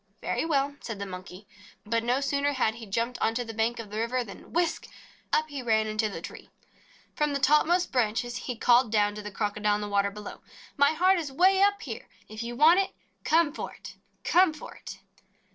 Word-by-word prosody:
"Very - - -2
well," 285 -3 0
said 225 -3 -6
the 200 - -4
Monkey. 185 +1 -9 0.4
But 230 +1 0
no 250 +3 +1
sooner 280 +1 0
had 245 -5 +1
he 225 -1 -10
jumped 230 +5 -2
onto 225 +2 +1
the 225 -1 -8
bank 225 +2 0
of 220 -3 -8
the 215 - -3
river 245 +2 0
than 200 -4 -12
whisk! 340 0 0 0.4
up 310 - +2
he 285 -2 -5
ran 220 -3 +2
into 215 0 -1
the 170 -4 -7
tree. - - -9 0.7
From 300 -1 0
the - - 0
topmost 300 +6 +3
branches 240 -1 0
he 250 - -5
called 240 0 +4
down 205 -2 +2
to 210 - -7
the 210 - -6
Crocodile 210 0 0
in 210 - -3
the 210 - -3
water 200 0 +1
below: 210 +1 -9 0.3
"My 285 +2 +4
heart 370 +3 +3
is 300 -4 -5
way 375 +7 +4
up 405 0 +3
here! 230 -7 -7 0.2
If 215 +1 -7
you 235 +1 -5
want 320 +8 +6
it, 390 - -1 0.3
come 320 -2 +3
for - - -6
it, - - -11 0.3
come 355 -3 +4
for - - -10
it - - -10
240 Hz, 210 wpm, -27 LUFS, 215-295 Hz, 0.7 s, want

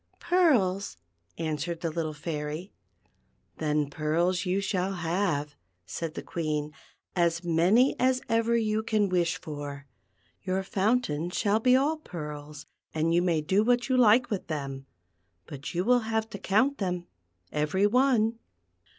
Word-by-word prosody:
" - - -42
Pearls," 225 - +2 0.4
answered 165 +1 -3
the 165 -2 -1
little 160 -1 -2
Fairy. 150 +3 -5 0.9
•'Then 150 -2 0
pearls 170 +5 0
you 185 +2 +1
shall 195 -1 -1
have," 170 -4 -1 0.3
said 165 - -5
the - - -5
Queen, 150 -2 -3 0.4
"as 170 0 +1
many 175 +10 +3
as 255 0 +3
ever 230 +1 +2
you 215 -1 0
can 215 -2 +1
wish 175 -2 +1
for. 145 -4 -7 0.6
Your 190 0 -1
fountain 190 -5 0
shall 205 +3 +1
be 250 +2 +4
all 290 +5 +2
pearls, 150 - -8 0.3
and 160 +1 +1
you 175 - +4
may 170 -3 +1
do 190 +7 +2
what 245 +2 +2
you 260 - +3
lik^vith 230 -3 +3
them; 135 -3 -5 0.6
but 145 +4 -7
you 180 +2 0
will 245 +1 +5
have 220 0 0
to 200 - -6
count 260 +9 +2
them, 180 -3 -2 0.5
every 150 +7 +1
one." 230 -1 +3
180 Hz, 140 wpm, -28 LUFS, 155-220 Hz, 0.9 s, will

